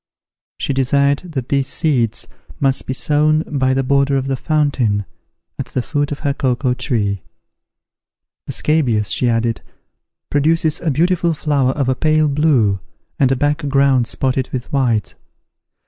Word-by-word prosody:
She 140 - -2
desired 140 +2 +2
that 130 -4 -4
these 140 -2 +1
seeds 130 -9 0 0.3
might 135 -1 +1
be - - -2
sown 155 +3 +2
by 130 -4 0
the 135 - +1
border 140 +1 +2
of 135 - -2
the 135 0 -1
fountain, 130 -9 0 0.5
at - - -3
the 125 - -3
foot 145 0 -1
of 145 - -5
her 140 -2 0
cocoa 130 -1 0
tree. 105 - -1 1.3
"The - - -4
scabious," 125 -10 +1
she 125 - +2
added, 115 0 0 0.7
"produces 160 +2 +1
a 170 - 0
beautiful 170 +3 +1
flower 140 -4 +1
of 140 -3 -1
a 130 - +3
pale 155 +2 +2
blue, 140 -10 +2 0.4
and 135 -2 +3
a - - +3
black 145 +2 -1
ground 135 -3 +3
spotted 130 +1 -1
with 125 +1 -5
white. 120 -7 +1
135 Hz, 150 wpm, -18 LUFS, 125-150 Hz, 1.3 s, a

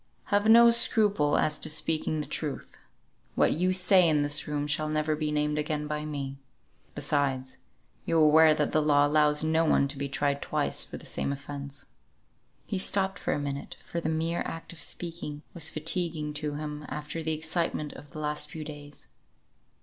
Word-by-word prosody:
Have 205 +1 +3
no 235 +1 +8
scruple 205 -10 +3
as 155 -1 +1
to - - -2
speaking 155 0 0
the - - -5
truth. 150 -4 -5 0.6
What - - +3
you 180 +3 +1
say 185 -1 +5
in 150 -2 +2
this 145 +1 0
room 145 -1 -2
shall 155 +1 -1
never 155 0 0
be 150 0 -2
named 150 0 0
again 150 0 -2
by 150 0 -3
me. 140 -2 -5 0.6
Besides, 135 -3 -1 0.4
you 165 - 0
are - - +6
aware 155 +1 +6
that 150 -1 0
the 155 - +2
law 145 -1 +4
allows 150 0 +3
no 160 +1 +2
one 145 -3 +3
to 140 - -2
be 140 0 -3
tried 140 +1 -1
twice - - -1
for - - -8
the - - -12
same - - -2
offence." 140 0 -6 0.8
He 195 - -3
stopped 190 -1 +1
for - - -1
a - - -2
minute, 140 -1 -5
for 170 - -4
the 160 - -2
mere 165 +2 -1
act 165 +1 -7
of 160 - -7
speaking 160 -3 -4
was 160 -2 -1
fatiguing 155 -1 0
to 150 0 -3
him 150 0 -5
after 150 +2 -5
the 160 0 -1
excitement 160 -1 -2
of 145 - -12
the 155 - -11
last 150 0 -1
few 155 0 -7
weeks. 145 -1 -9
150 Hz, 190 wpm, -28 LUFS, 145-160 Hz, 0.8 s, no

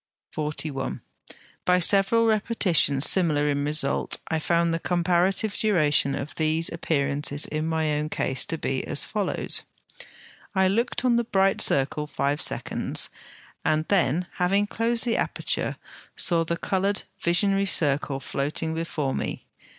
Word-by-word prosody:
By 180 0 +3
several 200 +5 +4
repetitions 195 - +2
similar 155 -6 +3
in 145 0 -1
result, 150 -1 0
I 160 - 0
found 170 +1 +1
the 165 - -1
comparative 180 +4 0
duration 150 -9 +1
of 140 +1 -6
these 160 +1 -1
appearances 145 -3 -2
in 155 +1 -3
my 160 -1 0
own 150 +1 -2
case 130 -3 -1
to 165 - -3
be 135 -3 -2
as - - 0
follows: 205 -3 -2 0.9
I 190 0 +3
looked 235 +5 -1
on 240 -2 +3
the 235 - +1
bright 195 -3 +1
circle 140 +2 +2
five 140 +1 -2
seconds, - - +1 0.5
and 155 +1 0
then, 180 -3 +2
having 195 +3 +2
closed 230 +3 0
the 235 - +1
aperture, - - -2 0.4
saw 170 -3 +3
the 170 +1 -3
coloured 195 +2 -1 0.2
visionary 195 +3 +2
circle 145 -5 +2
floating 150 +4 -2
before 160 -4 -3
me. - - -4
165 Hz, 135 wpm, -25 LUFS, 150-195 Hz, 0.9 s, several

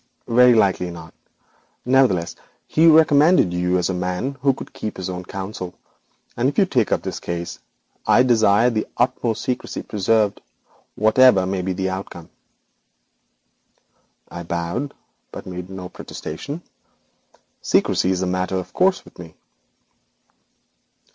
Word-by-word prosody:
'Very 125 +1 +5
likely 95 -4 +2
not. 80 -2 -10 0.7
Nevertheless, 125 -10 +2 0.3
he 160 +2 +3
recommended 155 - +5
you 90 +1 +1
as 90 - 0
a 95 - -2
man 90 +9 -3
who 135 0 +4
could 130 - -9
keep 110 - -6
his 95 0 -4
own 90 0 -6
counsel, 95 -1 -7 0.6
and 125 +3 +1
if - - -8
you 200 - +5
take 125 - 0
up - - 0
this - - -5
case 85 0 -5 0.5
I 125 - +5
desire 115 -1 +4
the 110 -2 -2
utmost 120 -2 0
secrecy 125 - -4
preserved, 105 0 0 0.5
whatever 110 -2 +5
may 95 0 -2
be 95 +1 -2
the 95 0 -2
outcome.' 95 -3 -7 2.0
I 85 - -8
bowed, 85 +11 -4 0.4
but - - -9
made 90 0 -7
no 95 -1 -7
protestation. 140 - -8 1.0
Secrecy 90 - +1
is 95 0 0
a - - 0
matter 90 +1 -1
of 95 -1 -5
course 190 +1 +2
with - - -18
me. 80 -3 -11
95 Hz, 135 wpm, -21 LUFS, 90-125 Hz, 2.0 s, Very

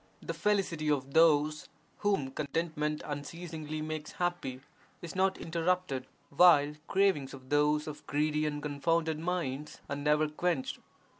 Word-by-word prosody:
The - - -5
felicity 185 -7 0
of 140 -2 0
those, 155 -2 +4 0.3
whom 195 -11 +1
contentment 150 +1 -2
un 145 -1 -3
ceasingly 155 -1 -6
makes 155 -1 -5
happy, 175 -8 -2 0.4
is 170 - -8
not 190 0 +2
interrupted, 165 -5 -1 0.2
while 150 -2 +6
cravings 190 -9 +2
of 130 -1 -15
those 150 +1 +3
of 150 -1 -8
greedy 150 +1 +1
and 145 -1 -3
confounded 160 +2 0
minds 155 -5 -3
are 140 - -3
never 150 +2 +2
quenched. 180 - -1
155 Hz, 135 wpm, -31 LUFS, 145-170 Hz, 0.4 s, while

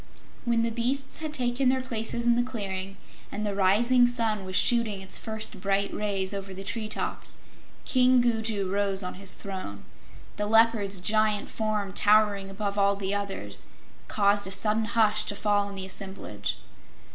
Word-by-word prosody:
When 235 -1 +2
the 230 - 0
beasts 250 +4 -2
had 310 -1 -4
taken 255 -1 +1
their 260 0 +2
places 235 -1 -2
in 235 0 +4
the 240 - +3
clearing 195 -6 -4 0.3
and 215 - -3
the 205 - -1
rising 235 +6 +4
sun 225 -5 0
was 185 0 -5
shooting 230 -1 +3
its 190 0 -1
first 220 -2 -5
bright 200 +1 0
rays 200 -2 -1
over 195 -1 -6
the 195 - -7
treetops, 215 +1 -3 0.5
King 255 -1 +4
Gugu 220 -4 0
rose 200 0 0
on 180 - -4
his 195 -2 +2
throne. 185 - -7 0.5
The 210 0 -1
Leopard's 220 -3 +3
giant 215 +1 +2
form, 210 -3 -2
towering 205 -2 +3
above 200 +1 -3
all 200 0 +3
the 195 0 -2
others, 195 - -4 0.4
caused 200 -1 +2
a - - -5
sudden 215 +3 +2
hush 215 -1 +2
to 205 - -2
fall 205 0 +1
on 200 - -8
the 190 -1 -5
assemblage. 190 - -5
205 Hz, 165 wpm, -27 LUFS, 195-230 Hz, 0.5 s, in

